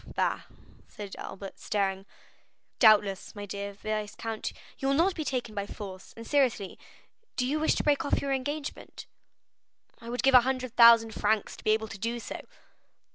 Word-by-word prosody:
"Bah!" - - 0 0.4
said 205 -2 -8
Albert, 195 0 -8
staring. 195 -1 -1 0.7
"Doubtless, 205 -4 +4
my 205 0 -6
dear 200 0 -5
viscount, 215 +2 -4 0.3
you 270 - -1
will 275 - +3
not 350 +6 +3
be 320 - -4
taken 250 -6 -3
by 200 -1 -3
force; 190 -3 -9
and 230 - -8
seriously, 255 -9 +1 0.6
do 250 - 0
you 290 +4 0
wish 315 - +2
to - - -1
break 290 -2 +2
off 285 - +1
your 275 -1 -1
engagement?" 285 +3 -5 0.9
"I 230 - -9
would 245 0 -2
give 270 0 +4
a 250 - +9
hundred 255 -1 -2
thousand 230 -1 +8
francs 210 0 0
to - - -14
be - - 0
able 220 0 +2
to 205 - -9
do 230 +3 -2
so." - - -7
225 Hz, 175 wpm, -29 LUFS, 205-265 Hz, 0.9 s, a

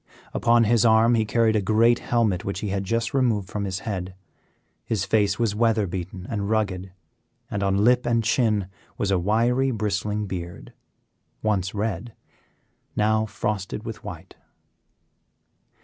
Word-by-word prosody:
Upon 120 0 +4
his 115 0 +3
arm 115 +1 +5
he 110 -2 +2
carried 110 0 +2
a 105 - +2
great 115 +4 +3
helmet 110 -6 0
which 100 -1 -4
he 105 - -2
had 100 0 -2
just 115 +3 -1
removed 115 -8 +1
from 105 -1 -3
his 95 -1 -3
head. 95 -4 -4 0.7
His 105 -4 -1
face 100 0 +2
was 115 -4 +1
weather 110 -1 +2
beaten 90 0 -6
and 105 -3 -3
rugged, 95 -4 -1 0.6
and 100 - -2
on 100 0 +1
lip 125 +2 +3
and 115 -1 +2
chin 110 -3 +2 0.3
was 100 - 0
a 95 - +3
wiry, 120 +8 +2
bristling 105 -2 -1
beard; 90 -3 -7 0.7
once 100 -2 0
red, 105 +1 -3 0.8
now 110 +1 +2
frosted 105 -2 -3
with - - -7
white. - - -9
105 Hz, 150 wpm, -24 LUFS, 100-115 Hz, 0.8 s, arm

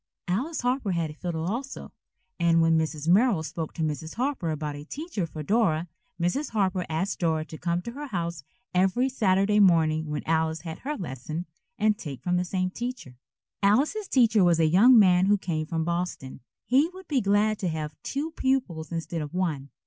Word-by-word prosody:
Alice 255 - -1
Harper 245 -5 0
had 165 -3 -1
a - - -10
fiddle 165 0 -4
also, 245 +9 -4 0.5
and 170 -1 +4
when 165 0 +4
Mrs. 160 -1 -1
Merrill 195 -1 +4
spoke 160 0 -5
to 160 - -2
Mrs. 155 +1 -3
Harper 250 - -1
about 150 -1 -3
a 145 - -8
teacher 255 - -4
for 155 -1 -7
Dora, 180 -4 +1 0.3
Mrs. 180 - 0
Harper 190 -4 0
asked 170 +4 -2
Dora 160 -2 0
to 160 - -9
come 170 +1 -1
to 235 - -5
her 290 +4 -7
house 170 - -3 0.3
every 190 +8 +2
Saturday 205 -3 +2
morning 160 -5 +4
when 150 -1 -3
Alice 160 0 0
had 165 -2 -7
her 295 +3 -4
lesson, 155 - -5 0.3
and 215 -1 +2
take 140 - -8
one 180 - +1
from - - +3
the 180 - 0
same 185 0 -1
teacher. 240 - -6 0.5
Alice's 280 - +2
teacher 230 -6 +4
was 170 -2 +4
a 160 - +4
young 210 +11 +6
man 185 -3 +5
who 205 +1 +4
came 160 -5 -3
from 165 0 -1
Boston. 170 -5 -3 0.3
He 275 +6 +3
would 375 +1 -13
be 275 -5 +1
glad 205 +1 +2
to 185 - -1
have 155 -2 -4
two 295 +4 -3
pupils 250 - -1
instead 165 0 -3
of 150 +2 -6
one. 155 -7 -1
180 Hz, 195 wpm, -26 LUFS, 160-225 Hz, 0.5 s, young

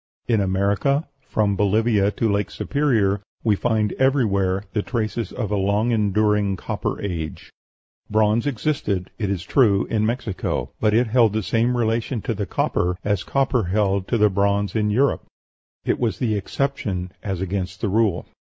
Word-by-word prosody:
In 115 -3 +2
America, 100 +10 +1 0.2
from 105 -2 +1
Bolivia 105 +1 +2
to 115 +2 -1
Lake 100 0 0
Superior, 110 -9 +1 0.2
we 110 -3 +3
find 110 -1 0
everywhere 100 -8 +2
the 105 - +1
traces 110 -2 -3
of 110 -5 -4
a - - +2
long 100 +4 +1
enduring 105 -2 +2
Copper - - -3
Age; 85 -6 -5 0.6
bronze 110 +3 +2
existed, 115 - -1
it 105 -3 -1
is 95 -3 -2
true, 105 -6 +3
in 110 -2 +1
Mexico, 115 -3 -2
but 110 -1 +2
it 120 +2 +4
held 115 -2 +3
the 110 0 -1
same 120 +4 +1
relation 115 +1 0
to 120 - -1
the 100 -2 -3
copper 90 +1 0
as 100 -2 0
the - - -19
copper 135 -5 +1
held 100 0 0
to 120 - +1
the 105 -1 +4
bronze 100 +1 +1
in 105 -1 +1
Europe 130 +7 +1 0.6
it - - 0
was 115 -3 0
the 120 -4 0
exception 100 -4 -2
as 95 -3 -3
against 95 -1 -3
the 105 - 0
rule. 105 -3 +1
105 Hz, 165 wpm, -22 LUFS, 100-115 Hz, 0.6 s, it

